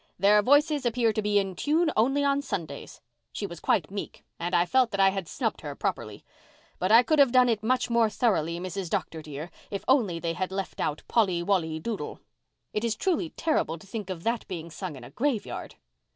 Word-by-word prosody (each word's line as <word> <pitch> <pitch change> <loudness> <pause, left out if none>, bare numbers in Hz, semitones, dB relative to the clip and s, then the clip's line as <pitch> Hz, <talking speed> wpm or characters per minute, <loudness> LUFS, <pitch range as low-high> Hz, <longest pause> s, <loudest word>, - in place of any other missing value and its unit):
Their 205 +3 +5
voices 290 +4 +3
appear 235 -2 +2
to 215 - 0
be 210 0 +1
in 195 -2 0
tune 315 - +1
only 270 +6 +2
on 280 0 +2
Sundays!' 160 - -6 0.3
She 205 - -4
was 170 -4 -7
quite 175 -2 +1
meek 200 0 -6 0.2
and 175 +2 -1
I 175 0 +4
felt 255 +4 +3
that 200 - -4
I 195 0 +6
had 190 -3 -4
snubbed - - -2
her - - -6
properly. - - -4 0.5
But 185 +3 0
I 230 +2 +8
could 310 +3 +2
have 275 -3 +6
done 255 0 +5
it 220 -3 +1
much 250 +4 +1
more 235 -2 +3
thoroughly, 180 -7 0
Mrs. 185 0 -4
Dr. 160 -1 -2
dear, 155 +2 -7 0.2
if 200 - -5
only 230 -10 +3
they 165 0 -2
had 185 +2 -3
left 195 -1 -4
out 150 0 -2
Polly 185 -7 +2
Wolly 165 -5 0
Doodle. 220 +6 -5 0.5
It 210 - -1
is 230 -2 0
truly 340 - 0
terrible 305 - -1
to 155 - -15
think 200 -1 -6
of 175 -3 -5
that 230 0 -1
being 170 -2 -6
sung 170 0 -6
in 130 - -11
a - - -11
graveyard." 245 -5 -2
205 Hz, 210 wpm, -27 LUFS, 175-245 Hz, 0.5 s, I